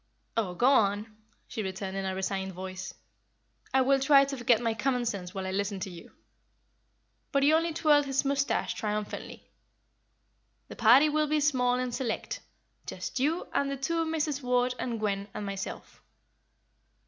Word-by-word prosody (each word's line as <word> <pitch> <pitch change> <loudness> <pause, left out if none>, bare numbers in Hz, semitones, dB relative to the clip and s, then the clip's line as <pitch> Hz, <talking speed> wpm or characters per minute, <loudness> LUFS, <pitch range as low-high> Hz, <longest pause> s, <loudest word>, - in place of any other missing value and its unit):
"Oh, 195 -6 -1
go 240 - +1
on," 215 -4 +3 0.3
she 225 - -4
returned, 190 0 -4
in 195 0 -2
a 190 - -2
resigned 190 0 -2
voice. 185 +1 -7 0.8
"I 265 - +4
will 270 +1 +3
try 275 0 +6
to 275 0 -4
forget 240 -3 +3
my 230 -2 0
common 250 +2 0
sense 190 -5 -3
while 190 -1 -3
I 190 - -3
listen 200 +1 -2
to 190 - -4
you." 170 -1 -12 1.2
But 275 -1 +2
he 295 +2 +5
only 330 +1 +2
twirled 300 -3 +3
his 270 +1 0
moustache 280 0 0
triumphantly. 210 -1 -4 1.2
"The - - -8
party 245 +6 +6
will 305 0 +1
be 305 +1 +2
small 255 -4 +2
and 250 -1 -2
select; 240 -2 -3 0.5
just - - -4
you 310 +7 0
and 280 - +1
the 275 - -3
two 330 +5 0
Misses 310 -3 -1
Ward 250 0 +1
and 235 -3 -3
Gwen 200 -2 -1
and 210 -1 -4
myself." 195 -1 -6
245 Hz, 165 wpm, -29 LUFS, 200-275 Hz, 1.2 s, try